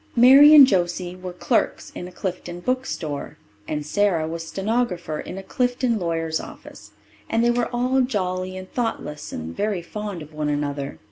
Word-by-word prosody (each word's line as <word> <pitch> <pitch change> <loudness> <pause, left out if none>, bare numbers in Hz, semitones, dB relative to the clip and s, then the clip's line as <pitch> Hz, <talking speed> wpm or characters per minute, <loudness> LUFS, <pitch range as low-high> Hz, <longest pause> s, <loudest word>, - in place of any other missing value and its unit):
Mary 275 +5 +9
and 285 -2 +11
Josie 180 -4 -1
were 185 0 -7
clerks 175 - -1
in 180 - -6
a - - -11
Clifton 180 -1 -5
bookstore, 175 - -3 0.3
and 150 -1 -3
Sara 175 -2 +1
was 165 0 -5
stenographer 195 -7 -2
in - - -7
a 195 - -6
Clifton 245 +1 0
lawyer's 165 -2 -1
office. 105 - -11 0.4
And 225 +1 +1
they 240 - +4
were 240 0 0
all 255 +2 +1
jolly 185 -6 -2
and 185 0 -8
thoughtless 150 -11 -3
and 80 +1 -6
very 205 -5 -1
fond 205 -2 -6
of 150 +1 -15
one 150 -1 -2
another. 145 -1 -3
185 Hz, 165 wpm, -23 LUFS, 160-235 Hz, 0.4 s, and